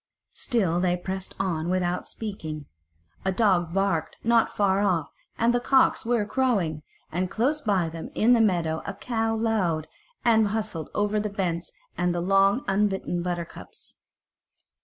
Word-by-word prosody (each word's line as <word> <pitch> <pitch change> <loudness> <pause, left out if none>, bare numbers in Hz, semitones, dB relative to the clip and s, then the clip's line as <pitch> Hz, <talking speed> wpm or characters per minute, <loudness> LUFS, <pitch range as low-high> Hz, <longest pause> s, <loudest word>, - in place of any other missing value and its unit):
Still 190 -9 0
they 180 0 +1
pressed 190 +1 -5
on 175 -4 -1
without 180 -1 -1
speaking; 160 -9 -6 0.6
a 190 - +1
dog 185 -5 +2
barked 195 -4 0
not 230 0 +4
far 195 -1 +1
off 180 -6 +1 0.3
and 235 +1 +3
the 245 - +2
cocks 265 -2 +3
were 235 -3 +2
crowing, 200 - 0 0.3
and 180 +2 -1
close 280 +9 0
by 195 -6 +1
them 160 0 -7
in 235 +3 +4
the 235 - +5
meadow 170 -6 +1
a 200 - -4
cow 225 0 -1
lowed 200 -9 0 0.4
and 220 -2 +5
went 205 - -2
hustling 215 -8 -3
over 205 +1 +1
the 210 0 -2
bents 180 -4 -2 0.3
and 175 0 +1
the - - 0
long, 195 +7 +3
unbitten 195 -3 0
buttercups. 175 -1 -6
195 Hz, 155 wpm, -26 LUFS, 175-220 Hz, 0.6 s, the